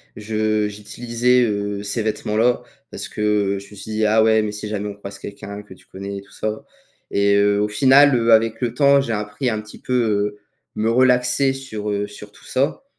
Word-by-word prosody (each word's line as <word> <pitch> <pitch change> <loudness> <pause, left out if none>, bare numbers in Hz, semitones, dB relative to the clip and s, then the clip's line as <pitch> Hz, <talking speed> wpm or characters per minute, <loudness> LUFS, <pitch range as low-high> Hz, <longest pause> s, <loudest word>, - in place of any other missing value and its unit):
je 110 0 -1
j'utilisais, 120 +4 0
heu, 100 -2 -2
ces 105 +3 -2
vêtements-là 110 +2 0 0.3
parce - - -6
que 105 -2 0
je 100 +1 -14
me - - -12
suis 105 +2 -8
dit: 110 0 0
«Ah 110 +1 +4
ouais, 110 0 +4
mais 105 -1 -3
si 105 0 -6
jamais 105 -1 -3
on 105 - -5
croise 100 0 -9
quelqu'un 100 0 -8
que 105 - -13
tu 95 - -20
connais 100 +1 -7
et - - -10
tout 100 - -20
ça» 110 0 -4 0.5
et 100 0 +3
heu, 100 0 +3
au 105 - +1
final, 135 +5 +5
heu, 115 -1 +2
avec 115 +1 +3
le 120 -2 -1
temps, 140 -1 +5
j'ai 135 - -3
appris 105 +4 -2
un 110 -2 -2
petit 110 0 -13
peu, 125 - -4
heu, 105 -4 0 0.4
me 110 +1 0
relaxer 125 +2 +3
sur, 120 -6 -5
heu, 100 0 -1
sur 105 0 -12
tout - - -19
ça 140 - -1
110 Hz, 215 wpm, -21 LUFS, 105-120 Hz, 0.5 s, final